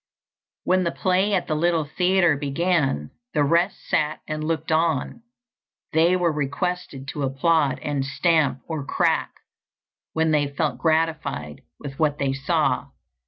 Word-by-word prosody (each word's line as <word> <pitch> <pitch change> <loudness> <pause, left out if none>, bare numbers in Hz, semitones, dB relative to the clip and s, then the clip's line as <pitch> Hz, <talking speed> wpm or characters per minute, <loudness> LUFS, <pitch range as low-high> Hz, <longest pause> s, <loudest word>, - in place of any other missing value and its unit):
When 185 0 +2
the 170 - +1
play 190 +2 +1
at 180 - 0
the - - -2
little 165 0 +1
theatre 180 +1 +2
began, 145 - 0 0.2
the 150 - +3
rest 170 +6 +1
sat 155 -1 0
and 155 -1 -3
looked 160 0 -2
on; 160 - 0 0.7
they 165 +3 +4
were 175 -2 +2
requested 145 -1 -3
to 145 - -5
applaud 140 +2 +1
and 145 -2 -1
stamp, 140 0 +1
or 160 -4 -3
crack, - - +1 0.8
when 160 0 +1
they 150 -2 +2
felt 145 +2 -2
gratified 155 - -1 0.2
with 135 -2 -8
what 150 -2 +2
they 135 -2 0
saw. 135 +1 0
155 Hz, 140 wpm, -23 LUFS, 140-170 Hz, 0.8 s, they